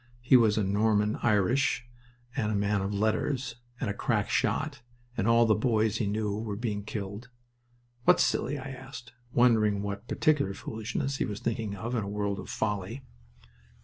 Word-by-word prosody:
He 125 - +5
was 110 -4 +5
Norman 105 +1 +2
Irish, 120 +6 +2 0.5
and 110 -6 0
a - - 0
man 100 0 +1
of 95 +1 -2
letters, 115 +4 0 0.2
and - - -2
a 100 - -1
crack 105 0 0
shot, 130 +4 0 0.3
and 100 - 0
all 115 0 +5
the 110 - +4
boys 110 -1 +1
he 110 - 0
knew 105 0 -1
were 110 -2 -3
being 105 -2 -3
killed. 105 +3 -6 0.8
"What's - - +6
silly?" 145 +3 0
I 135 0 -6
asked, 130 -2 -10 0.2
wondering 110 -5 +3
what 100 +2 -5
particular 140 -11 +1
foolishness 125 +5 -3
he - - 0
was 105 -1 -5
thinking 110 -3 -2
of, 115 +5 -4
in 115 -4 0
a 100 - -5
world 100 -1 -2
of - - -8
folly. 105 +4 -2
110 Hz, 170 wpm, -29 LUFS, 105-120 Hz, 0.8 s, What's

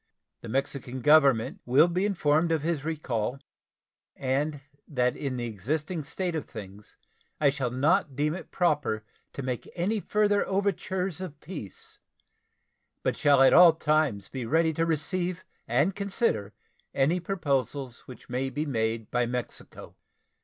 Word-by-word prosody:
The 115 - -8
Mexican 130 0 -3
Government 140 -5 +4
will 130 +7 +5
be 180 +3 0
informed 165 -4 +2
of 160 -3 +1
his 160 -3 -1
recall, 135 -7 -2 0.8
and 140 +3 -1 0.3
that 125 -3 +1
in 135 -3 -3
the 120 -1 -3
existing 150 - -3
state 180 +4 -2
of 160 -3 -3
things 100 0 -11 0.4
I 145 -2 +4
shall 135 -3 -2
not 145 +4 +1
deem 150 +3 +1
it 180 - -8
proper 150 - 0 0.3
to 140 - -5
make 125 -2 -4
any 195 +5 0
further 205 0 +2
overtures 190 -2 -1
of 155 -6 -7
peace, 150 - -9 1.0
but - - +1
shall 140 -2 +4
be - - +8
at - - +6
all 175 -2 +9
times 150 -10 0
ready 160 +6 +1
to 165 +2 0
receive 175 +3 -1 0.2
and 180 +7 +2
consider 190 - -1 0.4
any 150 +7 +2
proposals 140 -8 -2
which 130 - -12
may 130 +2 -2
be 150 +3 -3
made 110 -4 -2
by 120 -1 +1
Mexico. 125 0 -6
145 Hz, 145 wpm, -28 LUFS, 125-170 Hz, 1.0 s, all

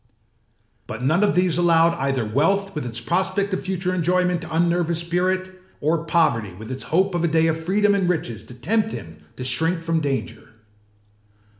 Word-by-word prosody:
But 115 +3 -6
none 155 +9 +2
of 205 - +2
these 180 -2 +2
allowed 165 -1 +4
either 135 -3 0
wealth 195 - +1
with 150 -5 -4
its 115 -1 -4
prospect 190 - 0
of 190 - -1
future 185 -1 -2
enjoyment 180 0 +1
to 160 0 -6
unnerve 170 0 +2
his 170 -1 -1
spirit, 185 +2 -1 0.3
or 160 +2 0
poverty 135 - +1
with 110 +5 -9
its 130 - -5
hope 190 +4 +1
of 175 -1 -1
a - - +3
day 160 0 +2
of 160 0 -1
freedom 205 +4 +2
and 190 -3 +1
riches 120 -11 -2
to 125 - -12
tempt 215 - 0
him 80 -1 -8 0.2
to 125 - -6
shrink 165 +7 +1
from 165 0 0
danger. 135 -5 -4
165 Hz, 185 wpm, -22 LUFS, 140-185 Hz, 0.3 s, allowed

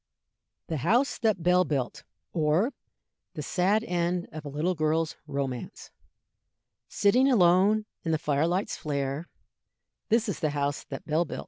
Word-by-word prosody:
THE 160 - -3
HOUSE 230 - +2
THAT 215 -7 +1
BELL 180 +1 +4
BUILT; 140 -7 -3 0.3
Or, 165 - +2 0.6
the - - -4
Sad 200 +4 +1
End 175 -3 -1
of 155 0 -7
a 145 - -6
little 155 +6 0
Girl's 160 0 0
Romance. 135 -3 -4 1.0
Sitting 250 +7 +3
alone 200 +1 +4 0.2
in 165 - -1
the 160 - +2
fire 150 0 +1
light's 185 +4 -1
flare, 140 +1 -3 0.8
This 230 +1 +3
is 200 - -3
the 155 - +1
house 140 0 -1
that 135 - -8
Bell 160 +3 +1
built. - - -6
170 Hz, 145 wpm, -28 LUFS, 150-195 Hz, 1.0 s, BELL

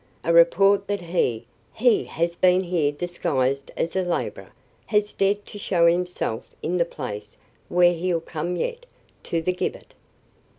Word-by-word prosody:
"A 170 - +1
report 195 +4 +5
that 205 -1 -2
he 165 -10 -1 0.3
he 240 0 +3
has 170 +1 -2
been 185 +1 +4
here 170 -5 +1
disguised 140 -5 -1
as 165 - -2
a 190 - +2
laborer, 170 - -3 0.4
has 210 0 +1
dared 200 +1 +1
to 205 - -10
show 175 -4 +2
himself 175 -9 0 0.2
in 180 +2 0
the 170 - +2
place 105 -10 -7 0.3
where 175 0 +5
he'll 175 0 -1
come 165 +2 -4
yet, - - -4 0.3
to 165 -1 -2
the 185 - +1
gibbet." 180 - -4
175 Hz, 155 wpm, -24 LUFS, 165-190 Hz, 0.4 s, report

